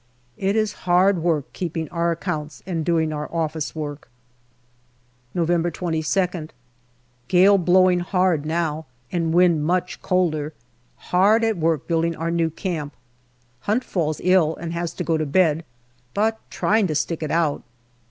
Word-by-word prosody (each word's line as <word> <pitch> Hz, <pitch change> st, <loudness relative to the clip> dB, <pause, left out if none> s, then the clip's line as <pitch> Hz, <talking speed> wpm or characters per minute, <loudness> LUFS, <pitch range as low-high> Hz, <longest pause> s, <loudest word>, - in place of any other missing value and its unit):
It 195 Hz, +2 st, 0 dB
is 215 Hz, -1 st, +1 dB, 0.2 s
hard 180 Hz, 0 st, +4 dB
work 160 Hz, -4 st, -1 dB
keeping 165 Hz, -3 st, -3 dB
our 170 Hz, 0 st, 0 dB
accounts 155 Hz, -2 st, -4 dB
and 170 Hz, -4 st, -2 dB
doing 160 Hz, -2 st, +1 dB
our 150 Hz, 0 st, -5 dB
office 160 Hz, -2 st, -2 dB
work. 145 Hz, -2 st, -6 dB, 1.3 s
November 175 Hz, 0 st, +1 dB
22nd. 170 Hz, 0 st, -1 dB, 0.8 s
Gale 195 Hz, +2 st, +5 dB
blowing 180 Hz, 0 st, +4 dB
hard 180 Hz, -3 st, +1 dB
now 160 Hz, -1 st, -2 dB, 0.2 s
and 165 Hz, -2 st, 0 dB
wind 170 Hz, -3 st, +4 dB
much 180 Hz, +3 st, -1 dB
colder. 155 Hz, -5 st, 0 dB, 0.6 s
Hard 205 Hz, +5 st, +4 dB
at 225 Hz, -3 st, +1 dB
work 160 Hz, -3 st, 0 dB
building 165 Hz, 0 st, +1 dB
our 165 Hz, +1 st, -2 dB
new 165 Hz, -1 st, +1 dB
camp. 155 Hz, -4 st, -4 dB, 0.7 s
Hunt 230 Hz, +5 st, +2 dB
falls 155 Hz, -8 st, -2 dB
ill 180 Hz, -4 st, +3 dB
and 170 Hz, 0 st, -6 dB
has 170 Hz, 0 st, -2 dB
to 180 Hz, -, -4 dB
go 165 Hz, -2 st, +1 dB
to 155 Hz, -, -1 dB
bed, 160 Hz, +1 st, +2 dB, 0.5 s
but 220 Hz, +2 st, +1 dB
trying 215 Hz, -2 st, +1 dB
to 155 Hz, -, -2 dB
stick 160 Hz, +2 st, -1 dB
it 155 Hz, -, -3 dB
out. 160 Hz, -3 st, +1 dB
170 Hz, 145 wpm, -22 LUFS, 155-180 Hz, 1.3 s, Gale